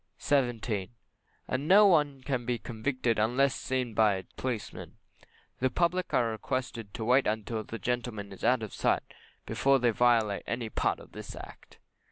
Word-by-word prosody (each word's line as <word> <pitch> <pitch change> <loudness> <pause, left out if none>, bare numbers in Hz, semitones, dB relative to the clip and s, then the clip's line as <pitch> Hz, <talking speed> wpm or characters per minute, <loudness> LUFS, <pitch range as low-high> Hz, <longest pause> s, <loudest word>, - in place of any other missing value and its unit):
17. 120 -6 0 0.5
And 130 +2 -1
as - - -5
no 205 +4 +8
one 150 -8 +3
can 130 -3 -1
be 120 0 -1
convicted 115 0 -1
unless 130 +5 +3
seen 130 -3 -2
by 105 -2 +4
a 95 - -5
policeman, 125 -5 -5 0.6
the 130 - +2
public 175 +6 0
are 115 -2 +2
requested 115 -1 -4
to 110 - -4
wait 130 +3 +4 0.2
till 110 -2 -3
that 115 +2 -8
gentlemen 120 -5 -3
is 95 - -13
out 120 0 +3
of 110 - -6
sight - - +1 0.4
before 135 0 +3
they 120 -2 +2
violate 115 -3 +2
any 115 -1 -3
part - - 0
of - - -14
this - - -8
Act. - - -12
120 Hz, 170 wpm, -29 LUFS, 110-130 Hz, 0.6 s, no